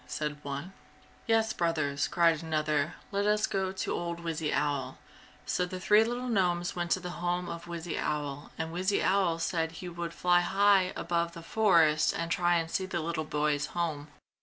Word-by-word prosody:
said 150 -1 -3
one. 140 +7 -5 0.5
"Yes, 225 -1 +2
brothers," 155 -5 0
cried 165 -2 +3
another, 155 -2 0 0.2
"Let 200 +1 0
us 210 0 +3
go 190 -1 -1
to 190 - -3
old 170 0 -3
Wizzy 160 -2 -2
Owl." 140 -3 -1 0.5
So 180 - 0
the 185 +1 -4
three 210 +4 +5
little 245 +2 -3
gnomes 180 -6 +1
went 175 -1 -2
to - - -1
the 180 -1 -6
home 175 0 -1
of 170 0 -6
Wizzy 170 -1 -4
Owl 145 -1 -3
and 160 0 -4
Wizzy 190 +3 +1
Owl 190 -4 +2
said 165 -1 -1
he 180 +1 -7
would 170 -1 -5
fly 175 0 +4
high 195 0 +3
above 170 -1 -1
the 170 -1 -9
forest 165 -7 +3
and 170 0 -3
try 175 0 +3
and 165 -1 -1
see 190 - -1
the 175 - -2
little 160 -1 -2
boy's 150 -1 0
home. 155 -4 -2
170 Hz, 185 wpm, -30 LUFS, 155-185 Hz, 0.5 s, three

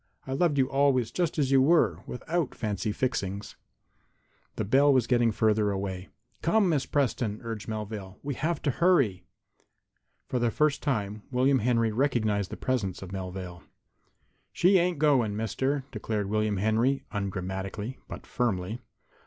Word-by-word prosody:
I 130 - -4
loved 150 +1 +2
you 130 -1 +3
always 135 -4 +2
just 175 -3 -1
as 140 -3 +1
you 135 -1 +6
were, 160 +5 +3
without 160 +3 -2
fancy 105 -1 -2
fixings." 100 -4 -3 1.0
The 110 - -2
bell 140 +7 +5
was 130 -4 +3
getting 120 -1 +3
farther 105 -1 +2
away. 95 -2 -4 0.3
"Come, 200 +4 +3
Miss 145 -5 0
Preston," 120 -6 0
urged 115 -2 -5
Melvale. 105 -3 -5
"We 140 0 -2
will - - -10
have 165 +2 -1
to 145 - +2
hurry." 135 - +2 1.0
For 125 - -2
the 120 -1 +2
first 150 +5 +1
time 105 -7 -2
William 130 +1 +3
Henry 115 -1 +2
recognized 110 -5 0
the - - -7
presence 100 -8 -2
of 95 - -9
Melvale. 90 -2 -6 0.9
"She 185 +2 +4
ain't 175 -1 +1
going, 135 -8 +3
Mister," 130 +6 -1
declared 105 -2 -3
William 105 -1 +1
Henry, 115 +7 +1
ungrammatically, 95 +3 -4
but - - -8
firmly. 105 -2 -2
115 Hz, 150 wpm, -28 LUFS, 105-135 Hz, 1.0 s, you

